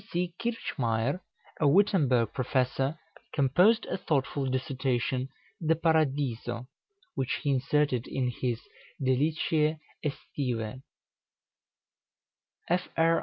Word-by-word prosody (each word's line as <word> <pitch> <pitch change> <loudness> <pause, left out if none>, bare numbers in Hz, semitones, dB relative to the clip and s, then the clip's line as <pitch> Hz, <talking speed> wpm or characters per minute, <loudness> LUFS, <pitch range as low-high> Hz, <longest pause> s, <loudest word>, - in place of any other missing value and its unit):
Kirchmayer, 140 - -1 0.4
a 150 - +4
Wittemberg 140 - +4
professor, 135 +3 0 0.4
composed 180 - +4
a - - -2
thoughtful 140 -4 0
dissertation, 130 0 -1 0.3
"De 165 +1 +3
Paradiso," 140 -7 +1 0.5
which 130 - -1
he 145 - +2
inserted 135 -1 +1
in 125 -2 -1
his 120 -1 -2 0.4
"Deliciæ 150 +3 +2 0.3
Æstivæ." 130 -4 -3 1.9
Fr. 165 -2 +2
135 Hz, 80 wpm, -29 LUFS, 125-155 Hz, 1.9 s, a